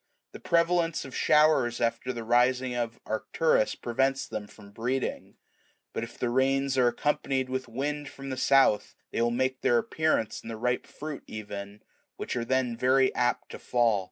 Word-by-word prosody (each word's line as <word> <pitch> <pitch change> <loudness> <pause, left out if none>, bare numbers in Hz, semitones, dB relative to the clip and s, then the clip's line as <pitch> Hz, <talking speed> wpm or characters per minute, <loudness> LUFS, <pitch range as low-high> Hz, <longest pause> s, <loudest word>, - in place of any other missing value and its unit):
The - - -10
prevalence 170 -1 +1
of 135 - -9
showers 150 -6 +3
after 120 +2 0
the 120 -2 -5
rising 125 +2 +2
of 120 -1 -3
Arcturus4 110 +3 0
prevents 135 +3 +1
them 105 -1 -5
from 100 -1 -15
breeding; 125 +5 -3 0.6
but - - -2
if 115 0 -9
the 120 - -1
rains 135 +1 +2
are 125 -2 +4
accompanied 130 +1 0
with 130 0 -3
wind 145 +4 -3
from 135 0 -8
the - - -2
south, 135 -5 +3 0.2
they - - -1
will 120 - +3
make 130 +2 -1
their 120 - +3
appearance 120 -3 0
in - - -9
the 115 - -5
ripe 125 +2 -1
fruit 150 -1 -7
even, 100 -1 -7 0.3
which - - -4
are 120 - -1
then 130 -1 0
very 130 +2 +3
apt 125 0 0
to - - -8
fall. 120 -4 +2
125 Hz, 175 wpm, -28 LUFS, 115-135 Hz, 0.6 s, are